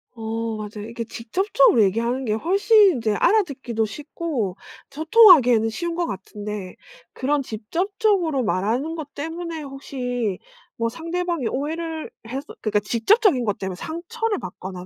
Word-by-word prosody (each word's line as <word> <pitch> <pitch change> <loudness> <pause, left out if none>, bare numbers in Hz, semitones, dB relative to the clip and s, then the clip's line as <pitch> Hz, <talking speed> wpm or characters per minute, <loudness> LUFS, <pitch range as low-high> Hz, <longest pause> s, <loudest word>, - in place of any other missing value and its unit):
어 225 0 -3
맞아요. 210 0 -7
이게 230 0 -4
직접적으로 245 - +2
얘기하는 235 +6 0
게 215 - 0
훨씬 395 - +4
인제 225 -4 0
알아듣기도 265 - +1
쉽고 280 - -4 0.3
소통하기에는 290 - +6
쉬운 340 +9 -3
것 345 -1 -1
같은데 200 0 -6 0.4
그런 280 +1 0
직접적으로 340 - 0
말하는 230 - 0
것 295 -3 -7
때문에 325 +1 -5
혹시 250 -6 -4 0.4
뭐 230 0 -1
상대방이 335 -1 -2
오해를 320 +3 -3 0.2
해서 270 +5 -5 0.2
그니까 210 -1 +1
직접적인 250 - +3
것 205 - -1
때문에 190 -1 -4
상처를 405 - -3
받거나 180 0 -8
265 Hz, 330 characters per minute, -23 LUFS, 220-335 Hz, 0.4 s, 소통하기에는